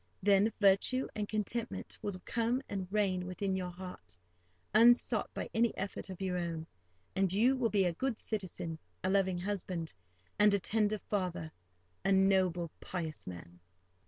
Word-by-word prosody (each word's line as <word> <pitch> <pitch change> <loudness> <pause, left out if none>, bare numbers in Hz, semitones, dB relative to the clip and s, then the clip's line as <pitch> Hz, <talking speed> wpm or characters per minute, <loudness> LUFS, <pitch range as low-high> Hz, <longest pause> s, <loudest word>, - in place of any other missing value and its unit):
Then 200 +2 +5
virtue 205 +6 +4
and 210 -1 -2
contentment 215 +2 -3
will 200 -3 -3
come 240 +3 0
and 190 -2 -3
reign 190 -4 +1
within 190 +1 -2
your 180 -1 -2
heart, 175 - -9 0.6
unsought 235 +3 +5
by - - -3
any 230 0 +2
effort 195 0 -4
of 185 - -7
your 185 -1 -1
own; 165 -2 -3 0.5
and 190 -2 +2
you 235 +7 +4
will 250 -3 +1
be 200 -3 +3
a 175 - +1
good 250 +5 -1
citizen, 180 -7 -3 0.2
a 185 - +1
loving 190 -2 +2
husband, 180 -3 -3 0.5
and 210 -1 +6
a - - +2
tender 215 +2 +1
father—a 160 - -4
noble, 190 -3 +3
pious 165 -4 -5
man. 90 -1 -9
190 Hz, 150 wpm, -33 LUFS, 175-210 Hz, 0.6 s, and